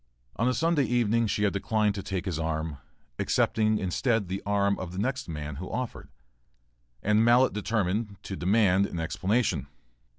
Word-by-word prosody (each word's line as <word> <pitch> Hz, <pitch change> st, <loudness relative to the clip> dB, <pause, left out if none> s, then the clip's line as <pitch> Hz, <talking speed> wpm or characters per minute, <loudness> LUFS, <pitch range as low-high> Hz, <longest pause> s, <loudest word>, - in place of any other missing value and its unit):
On 115 Hz, -, +1 dB
a 125 Hz, -, +2 dB
Sunday 165 Hz, -4 st, +2 dB
evening 115 Hz, -2 st, +2 dB
she 105 Hz, 0 st, 0 dB
had 100 Hz, -, +2 dB
declined 105 Hz, +1 st, +1 dB
to 100 Hz, -, -4 dB
take 95 Hz, -2 st, -4 dB
his 85 Hz, -4 st, -2 dB
arm, 80 Hz, -2 st, -2 dB, 0.4 s
accepting 110 Hz, -1 st, +2 dB
instead 100 Hz, +2 st, 0 dB
the 95 Hz, +1 st, -3 dB
arm 100 Hz, 0 st, +2 dB
of 90 Hz, -1 st, -6 dB
the -, -, -7 dB
next 130 Hz, +2 st, -2 dB
man 75 Hz, -2 st, -5 dB
who 90 Hz, +4 st, -6 dB
offered, 125 Hz, -2 st, -5 dB, 0.9 s
and 105 Hz, +2 st, +3 dB
Mallett 120 Hz, +3 st, +5 dB
determined 105 Hz, 0 st, -1 dB
to 95 Hz, -, -5 dB
demand 100 Hz, 0 st, +3 dB
an 85 Hz, -, -5 dB
explanation. 95 Hz, +8 st, 0 dB
100 Hz, 165 wpm, -28 LUFS, 90-115 Hz, 0.9 s, Mallett